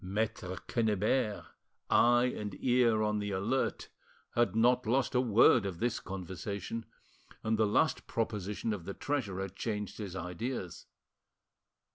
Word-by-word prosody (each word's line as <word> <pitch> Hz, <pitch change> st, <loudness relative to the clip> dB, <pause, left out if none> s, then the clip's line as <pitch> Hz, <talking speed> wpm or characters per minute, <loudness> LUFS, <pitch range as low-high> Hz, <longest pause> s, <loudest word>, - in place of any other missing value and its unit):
Maitre 95 Hz, -1 st, -2 dB
Quennebert, 110 Hz, 0 st, +1 dB, 0.4 s
eye 120 Hz, +1 st, +4 dB
and 105 Hz, -2 st, -5 dB
ear 120 Hz, -3 st, +3 dB
on 105 Hz, 0 st, +1 dB
the 105 Hz, 0 st, -3 dB
alert, 100 Hz, +7 st, -1 dB, 0.4 s
had 120 Hz, -2 st, +2 dB
not 120 Hz, +1 st, +3 dB
lost 130 Hz, +3 st, +1 dB
a 125 Hz, -, +4 dB
word 120 Hz, -1 st, +5 dB
of 95 Hz, -3 st, -4 dB
this 120 Hz, +4 st, 0 dB
conversation, 95 Hz, +4 st, -5 dB, 0.6 s
and 110 Hz, 0 st, +1 dB
the 110 Hz, -1 st, +3 dB
last 100 Hz, -, +1 dB
proposition 105 Hz, -1 st, -2 dB
of 90 Hz, -5 st, -6 dB
the 100 Hz, -, -5 dB
treasurer 100 Hz, -10 st, -2 dB
changed 105 Hz, +2 st, -4 dB
his 100 Hz, -4 st, -5 dB
ideas. 90 Hz, +2 st, -5 dB
105 Hz, 130 wpm, -32 LUFS, 100-120 Hz, 0.6 s, word